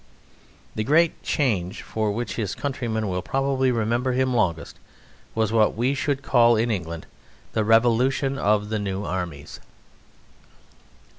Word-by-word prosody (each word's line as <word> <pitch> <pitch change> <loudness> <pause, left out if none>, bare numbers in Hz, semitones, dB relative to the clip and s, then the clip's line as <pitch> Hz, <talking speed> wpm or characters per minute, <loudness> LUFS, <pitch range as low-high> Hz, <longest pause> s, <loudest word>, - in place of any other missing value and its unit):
The 110 - -2
great 160 +7 +2
change 100 - -1
for 110 -1 -2
which 115 +1 -3
his 105 -5 -3
countrymen 120 -6 -2
will 90 -1 -2
probably 135 +3 0
remember 120 +2 0
him 130 0 +1
longest 85 -8 -1 0.6
was 110 -1 +1
what 110 -2 +3
we 125 +5 +1
should 140 0 -2
call 120 -3 +4
in 115 +2 +1
England 85 -5 -4 0.5
the 110 - +1
revolution 125 +5 +2
of 105 -1 +1
the 110 -1 -1
New 100 0 -3
Armies. 85 -6 -5
115 Hz, 135 wpm, -24 LUFS, 105-130 Hz, 0.6 s, call